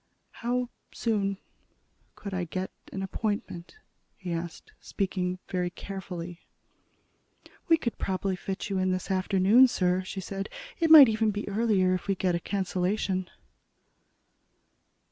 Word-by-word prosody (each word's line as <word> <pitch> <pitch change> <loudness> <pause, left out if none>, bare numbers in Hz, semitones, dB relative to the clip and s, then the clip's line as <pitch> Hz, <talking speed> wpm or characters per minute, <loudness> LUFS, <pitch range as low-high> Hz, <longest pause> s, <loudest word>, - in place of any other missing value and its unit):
"How 245 +1 -2 0.2
soon 200 -4 -1 0.8
could 200 -2 -7
I 185 -1 -1
get 185 +3 -4 0.2
an 195 - -4
appointment?" 195 - -4 0.4
he 180 -3 -4
asked, 170 0 -6
speaking 185 -2 -2
very 180 -1 -1
carefully. 180 -2 -7 1.3
"We 330 -2 +6
could 240 -7 -4
probably 190 0 -1
fit 190 +1 -5
you 195 -2 -1
in 185 - +1
late - - +2
this 185 +1 -5
afternoon, 195 +6 +5
sir," 180 -5 +1
she 190 +1 -6
said. 195 +1 -5 0.3
"It 330 -2 +2
might 305 -4 +11
even 220 0 +1
be 205 0 -3
earlier, 205 -3 +2
if 185 - -3
we 195 - +1
get 185 -1 0
a 170 - 0
cancellation." 185 0 -1
190 Hz, 135 wpm, -28 LUFS, 185-210 Hz, 1.3 s, might